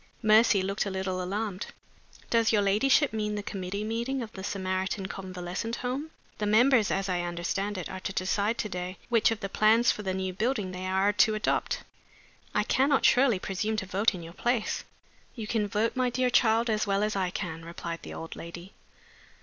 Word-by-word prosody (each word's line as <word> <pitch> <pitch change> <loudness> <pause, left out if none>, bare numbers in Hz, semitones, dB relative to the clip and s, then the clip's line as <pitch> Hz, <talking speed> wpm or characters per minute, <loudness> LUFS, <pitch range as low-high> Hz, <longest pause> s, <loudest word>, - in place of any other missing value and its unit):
Mercy 215 -2 +5
looked 195 +2 -1
a - - -1
little 190 -1 -2
alarmed. 200 +2 -3 0.6
"Does 230 -1 +4
your 210 -2 +3
ladyship 240 +7 +3
mean 210 -1 -1
the 205 - -3
committee 200 0 -4
meeting 235 +4 -2
of 220 - -8
the 190 - -8
Samaritan 190 0 -2
Convalescent 190 +3 -4
Home? 260 +6 -3 0.3
The 210 - 0
members, 225 +1 +5
as 195 0 0
I 180 -2 0
understand 175 +4 -2
it, 185 - -4
are 190 - -6
to 190 - -4
decide 200 +4 0
to - - -2
day 180 -1 -5
which 230 -2 +4
of 225 -2 -3
the 195 - -2
plans 220 +4 +4
for - - -5
the 190 -2 -2
new 190 -1 -2
building 215 -1 -1
they 185 0 -5
are 190 +2 +2
to 215 +2 +4
adopt. 215 - -1 0.7
I 210 - +3
cannot 270 +5 +2
surely 250 -4 +5
presume 210 +4 -2
to 205 - -2
vote 195 +3 +1
in 175 - -7
your 165 +1 -10
place?" 240 +2 -1 0.5
"You 225 -4 -5
can 210 -1 0
vote, 215 +4 0
my 255 -1 +2
dear 250 +1 +1
child, 230 -1 +4
just 215 -2 0
as - - 0
well 200 +1 +1
as 215 0 0
I 190 -2 0
can," 165 -2 -5
replied 170 0 -6
the - - -8
old 165 - -7
lady. 170 +3 -9
205 Hz, 200 wpm, -28 LUFS, 185-225 Hz, 0.7 s, Mercy